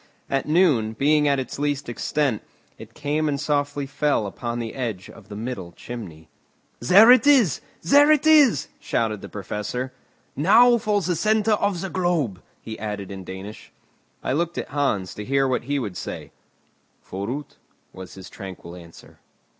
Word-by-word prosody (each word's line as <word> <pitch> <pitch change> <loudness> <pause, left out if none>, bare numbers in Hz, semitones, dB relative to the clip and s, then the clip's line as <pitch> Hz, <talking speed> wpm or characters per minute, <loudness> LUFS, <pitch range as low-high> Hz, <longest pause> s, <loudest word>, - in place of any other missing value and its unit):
At 135 +1 0
noon, 150 -10 +3
being 150 +5 +2
at 140 -1 +2
its 130 +1 -6
least 145 -1 -1
extent, 120 0 -1 0.4
it - - -12
came 150 +1 -1
and 140 -1 -2
softly 145 -1 -1
fell 145 -4 0
upon 120 +4 -5
the 115 -2 -4
edge 115 -8 -5
of 110 - -16
the 105 - -8
middle 105 -6 -6
chimney. 90 -9 -9 0.5
"There 200 - +7
it 255 +3 +5
is! 250 - +4 0.2
there 290 - +6
it 305 -1 +3
is!" 300 -6 +5
shouted 110 -3 -2
the - - -9
Professor. 105 +6 -5 0.4
"Now 235 - +5
for 210 -1 0
the 180 0 -1
centre 215 +5 +1
of 200 -4 0
the 190 - -4
globe!" 165 - -1 0.2
he 110 - -7
added 105 -2 -5
in 95 -1 -7
Danish. 95 +3 -9 0.5
I - - -1
looked 170 +3 -1
at - - -4
Hans, 135 -10 -1
to 105 - -7
hear 135 +4 +1
what 125 -2 -1
he 145 +2 -1
would 105 -9 -4
say. - - -7 0.8
"Forüt!" 115 +10 -5 0.4
was 95 -1 -10
his 95 -1 -10
tranquil 90 -3 -10
answer. 85 -2 -15
135 Hz, 165 wpm, -23 LUFS, 105-170 Hz, 0.8 s, There